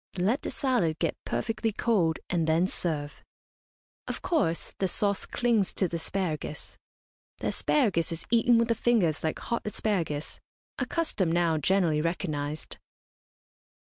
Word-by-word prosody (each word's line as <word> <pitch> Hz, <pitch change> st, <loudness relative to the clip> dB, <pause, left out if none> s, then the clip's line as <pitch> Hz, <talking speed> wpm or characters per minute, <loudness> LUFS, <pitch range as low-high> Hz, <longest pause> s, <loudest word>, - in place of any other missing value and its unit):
Let 210 Hz, +10 st, +1 dB
the -, -, -4 dB
salad 235 Hz, -, +1 dB
get 165 Hz, -2 st, 0 dB
perfectly 225 Hz, -1 st, -1 dB
cold, 195 Hz, -7 st, +1 dB
and 165 Hz, -3 st, 0 dB
then 165 Hz, +3 st, +3 dB
serve. 150 Hz, -6 st, -3 dB, 0.8 s
Of -, -, -4 dB
course, 310 Hz, -, 0 dB
the 190 Hz, -, +2 dB
sauce 200 Hz, +2 st, 0 dB
clings 230 Hz, -5 st, +1 dB
to 190 Hz, -, +2 dB
the 170 Hz, -, -3 dB
asparagus. 160 Hz, -3 st, -3 dB, 0.6 s
The -, -, -2 dB
asparagus 195 Hz, -, +1 dB
is 165 Hz, 0 st, -5 dB
eaten 235 Hz, 0 st, +5 dB
with 230 Hz, 0 st, +2 dB
the -, -, +5 dB
fingers 210 Hz, -9 st, +2 dB
like 160 Hz, -, 0 dB
hot 235 Hz, -, -2 dB
asparagus 180 Hz, -8 st, -2 dB, 0.4 s
a -, -, -1 dB
custom 260 Hz, -, 0 dB
now 170 Hz, -2 st, +2 dB
generally 165 Hz, -2 st, +2 dB
recognised. 155 Hz, -3 st, -3 dB
180 Hz, 140 wpm, -28 LUFS, 160-225 Hz, 0.8 s, eaten